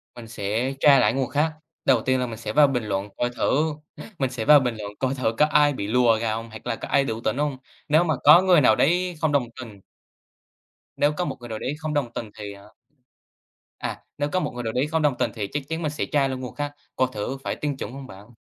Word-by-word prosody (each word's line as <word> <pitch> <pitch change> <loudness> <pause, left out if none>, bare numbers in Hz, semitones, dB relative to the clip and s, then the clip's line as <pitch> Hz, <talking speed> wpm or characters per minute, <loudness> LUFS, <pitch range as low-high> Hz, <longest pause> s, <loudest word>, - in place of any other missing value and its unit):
Mình 115 -2 -10
sẽ 115 +5 -2
tra 140 -2 +6
lại 105 +2 +3
những 135 - -2
nguồn 130 - -2
khác. 150 +2 +1 0.3
Đầu 125 -4 +4
tiên 130 +1 +1
là 125 - 0
mình 110 -2 -7
sẽ 115 - -5
vào 145 0 +6
bình 125 -4 -1
luận 100 0 -3
coi 120 - 0
thử 150 +5 0 0.5
mình 135 -2 +1
sẽ 120 -3 -4
vào 150 0 +8
bình 125 -3 -1
luận 105 -1 -6
coi 130 0 0
thử 125 -4 0
có 150 - +5
ai 150 -1 +3
bị 100 -5 -4
lùa 120 -1 +3
gà 110 -1 0
không 115 +1 -6
hoặc 110 0 -10
là - - 0
có - - -7
ai 140 - +3
đủ 115 -4 -4
tỉnh 130 - -1
không. 145 -2 -1 0.3
Nếu 155 +3 +4
mà 160 -3 +1
có 150 +5 +9
người 180 -5 +5
nào 110 -4 +5
đấy 180 +4 +1
không 160 - +2
đồng 140 -4 +1
tình 110 -6 -10 1.2
Nếu 145 +1 +2
có 180 - 0
một - - -4
người 120 - -10
nào 110 -1 -4
đấy 135 - -3
không 155 -1 -3
đồng 130 -5 -1
tình 110 - -5
thì, 105 -1 -7
ờ 100 0 -16 1.1
À, - - -5 0.2
nếu 145 0 -1
có 185 - +1
một - - -2
người 120 0 -6
nào 110 -1 -3
đấy 130 +4 +1
không 160 +1 0
đồng 145 -4 +1
tình - - 0
thì 105 -3 -4
chắc 145 -1 -2
chắn 160 +1 -3
mình 150 -2 -1
sẽ 150 - -3
tra 140 -2 +1
luôn 130 -1 -4
nguồn 125 - -7
khác, 145 0 -4 0.2
coi 130 - +2
thử 110 +6 -4
phải - - -2
tin 145 -3 -3
chuẩn 110 - -5
không 135 0 -9
bạn. 105 +2 -13
130 Hz, 270 wpm, -24 LUFS, 115-150 Hz, 1.2 s, có